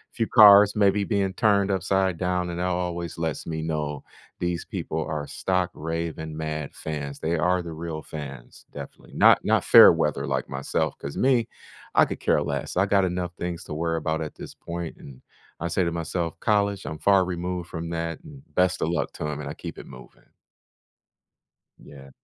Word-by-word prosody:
few 115 -2 0
cars 105 -2 +8
maybe 100 -1 +3
being 100 -3 0
turned 100 -1 +2
upside 95 -1 +1
down, 90 0 -1
and 85 0 -4
that 90 - 0
always 90 -1 -3
lets 80 -3 -3
me 80 -1 -4
know 75 -3 -3 0.4
these 90 -1 -2
people 80 - -4
are 75 -2 -3
stock 90 +4 -1
raving 80 0 -4
mad 75 -2 -4
fans. 70 -2 -5
They 80 +1 -1
are 90 +3 +2
the 85 - -7
real 80 -1 -5
fans, 70 -5 -9
definitely, - - -10
not - - +6
not - - +2
fair - - +9
weather - - -1
like - - -1
myself - - -2
'cause 70 - -6
me, 125 -3 +3 0.5
I - - +7
could - - -6
care - - +2
less. 70 -1 -4
I 95 - +4
got 100 -1 +3
enough 90 -1 -3
things 85 -1 -4
to - - -7
worry 80 +1 -1
about 80 0 -2
at 75 - -6
this - - -9
point, 85 -1 -6
and 65 -2 -13 0.4
I 85 - -1
say 90 +2 +1
to 85 - -1
myself, 85 0 -3
"College, 100 -2 +1
I'm 80 0 -6
far 100 -1 +4
removed 90 -1 -4
from 85 0 -5
that, 85 0 -3
and 145 -4 -13
best 90 0 +2
of - - +1
luck 85 - -2
to - - -6
'em," 75 -1 -4
and 70 -2 -5
I - - -5
keep - - -8
it - - -10
moving. 65 0 -15 1.5
Yeah. 70 -1 -13
85 Hz, 190 wpm, -25 LUFS, 80-95 Hz, 1.5 s, fair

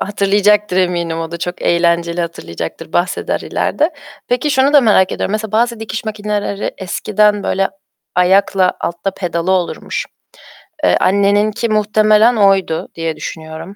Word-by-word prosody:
Hatırlayacaktır, 205 0 +2
eminim 175 -3 0
o 165 0 -5
da 170 - -5
çok 175 +1 -5
eğlenceli 170 0 +1
hatırlayacaktır, 160 - -6
bahseder 175 +1 -1
ileride. 305 +3 -1 0.4
Peki, 250 +5 0
şunu 270 +1 +3
da 290 - +7
merak 205 -6 +3
ediyorum, - - -2
mesela 215 -1 -3
bazı 235 +1 +1
dikiş 220 0 -5
makineleri 210 -1 -3
eskiden 210 +2 +1
böyle 195 0 0 0.5
ayakla 185 +1 +3
altta 170 +3 -2
pedalı 175 -1 -3
olurmuş. 185 -2 -2 0.8
Eee, 90 -1 +4
anneninki 205 +4 +2
muhtemelen 215 +2 +3
oydu, 195 -6 +2
diye 165 -1 -3
düşünüyorum. 160 +3 -8
195 Hz, 130 wpm, -16 LUFS, 170-215 Hz, 0.8 s, da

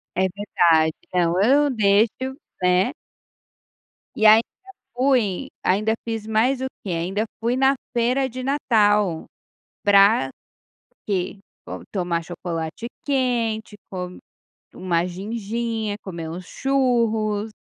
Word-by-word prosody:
É 185 - +1
verdade. 170 -5 +2 0.2
Não, 170 -2 +2
ou 185 +3 +2
eu 285 +5 +4
deixo, 225 +4 +2 0.3
né. 180 +8 +3 1.2
E 215 - +3
ainda 220 +2 +8 0.5
fui 250 -8 +1
ainda 210 +4 +2
fiz 225 -2 -3
mais 240 +4 +2
o - - 0 0.2
quê? 195 - -5
Ainda 185 +6 -1 0.2
fui 235 +2 0
na 270 +1 +4 0.2
feira 250 +3 +1
de 255 +1 -7
Natal. 210 - +2 0.6
Pra 200 -8 +5 0.8
quê? 195 0 -2 0.3
Bom, - - -7
tomar 175 -4 -1
chocolate 170 +4 -5 0.2
quente, 235 -6 0
com 180 -1 -6 0.6
uma 175 -2 0
ginginha, 220 +3 -3
comer 170 -4 -6
uns 180 +3 -7
churros. 225 -6 0
215 Hz, 110 wpm, -23 LUFS, 180-235 Hz, 1.2 s, ainda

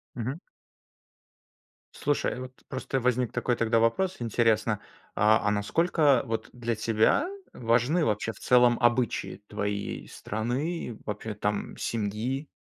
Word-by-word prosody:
Мгм. 130 +7 -3 1.5
Слушай, 145 -3 -1
вот 130 0 -7 0.2
просто 130 0 -2
возник 125 -1 +1
такой 120 - 0
тогда 115 0 +2
вопрос. 180 +12 +1
Интересно, 115 -2 +1 0.4
а 110 +1 +5
а 105 - +4
насколько 140 - +3
вот 115 -2 -3
для 120 -1 -2
тебя 110 - +2 0.3
важны 125 +8 +2
вообще 105 +1 0
в 100 - -15
целом 125 -1 +5
обычаи 120 -3 +1
твоей 100 0 -3
страны, 120 - -3
вообще 105 +1 -4
там 105 0 -2
семьи? 115 +6 -2
115 Hz, 120 wpm, -28 LUFS, 110-130 Hz, 1.5 s, а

